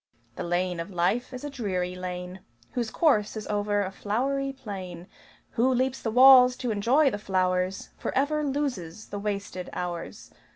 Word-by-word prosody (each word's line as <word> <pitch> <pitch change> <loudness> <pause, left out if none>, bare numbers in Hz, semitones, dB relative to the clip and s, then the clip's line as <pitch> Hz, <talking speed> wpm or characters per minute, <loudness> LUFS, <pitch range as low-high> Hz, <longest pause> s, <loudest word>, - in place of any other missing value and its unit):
The - - -5
lane 175 0 -1
of 165 +4 -5
life 190 +8 0
is 255 0 -7
a 290 - -4
dreary 185 -8 -2
lane 180 0 -6 0.3
Whose 240 -3 -2
course 220 -10 +2
is 215 - -5
over 205 0 0
a 190 - -4
flowery 270 +8 -1
plain. 190 -9 -7 0.5
Who 250 +3 +2
leaps 260 +1 0
the 225 - -2
walls 250 +1 +8
to 250 -2 -3
enjoy 255 +8 +3
the 205 - -4
flowers 185 -1 0
Forever 300 +3 0
loses 250 - -3
the 205 - -4
wasted 200 -3 -4
hours. 175 -2 -5
205 Hz, 160 wpm, -27 LUFS, 185-255 Hz, 0.5 s, walls